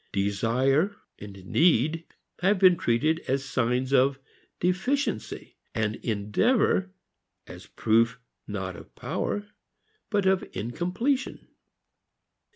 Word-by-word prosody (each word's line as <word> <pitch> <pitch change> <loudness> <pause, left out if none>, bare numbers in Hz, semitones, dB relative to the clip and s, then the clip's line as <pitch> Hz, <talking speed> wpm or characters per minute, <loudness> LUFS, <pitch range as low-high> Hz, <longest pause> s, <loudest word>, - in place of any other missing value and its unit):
Desire 125 - +1 0.2
and 100 -2 -10
need 160 - +2 0.3
have 195 +3 +3
been 185 -1 +6
treated 155 +4 +1
as 135 +1 0
signs 125 +1 0
of 135 +1 +4 0.4
deficiency, 190 - -1 0.2
and 110 -1 -1
endeavor 185 - +1 0.6
as - - -11
proof 115 +3 +1 0.3
not 95 -3 -4
of - - -14
power 205 - -3 0.6
but 205 -3 +1
of 190 0 +3
incompletion. 180 - -2
135 Hz, 95 wpm, -27 LUFS, 110-185 Hz, 0.6 s, been